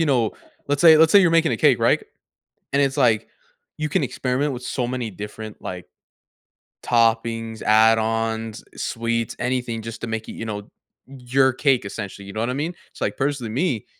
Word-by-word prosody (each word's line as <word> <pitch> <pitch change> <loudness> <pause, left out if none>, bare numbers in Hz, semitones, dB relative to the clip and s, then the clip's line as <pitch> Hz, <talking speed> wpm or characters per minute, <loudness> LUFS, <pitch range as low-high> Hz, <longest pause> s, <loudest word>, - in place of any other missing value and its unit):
you 160 - +2
know, 120 -6 +2 0.4
let's 145 0 0
say 160 -2 +8
let's 160 +1 +5
say 200 - +8
you're 175 -3 +4
making 165 -6 +3
a - - 0
cake, - - +4
right? - - +3 0.7
And 140 - +3
it's 135 +1 0
like, 115 -6 +2 0.5
you 155 0 -1
can 150 - +1
experiment 135 +3 -1
with 125 0 -6
so 125 -1 -2
many 125 -3 -3
different, 105 +2 -8
like, 90 -1 -7 1.0
toppings, 115 -1 +1
add-ons, 110 0 +2
eh, - - -17
sweets, 115 -1 -2
anything 125 -2 -2
just 115 0 -8
to 120 - -4
make 110 -1 -4
it, - - -6
you 115 - -6
know, 105 -2 -6 0.4
your 130 0 +1
cake, 130 -5 +2
essentially, 100 -1 -7
you 100 - -8
know 110 - -3
what 120 - -1
I - - -1
mean? 150 +6 -2 0.2
It's, - - -16
like, - - -1
personally, 135 -5 -2
me, 130 - -1
120 Hz, 195 wpm, -22 LUFS, 110-135 Hz, 1.0 s, say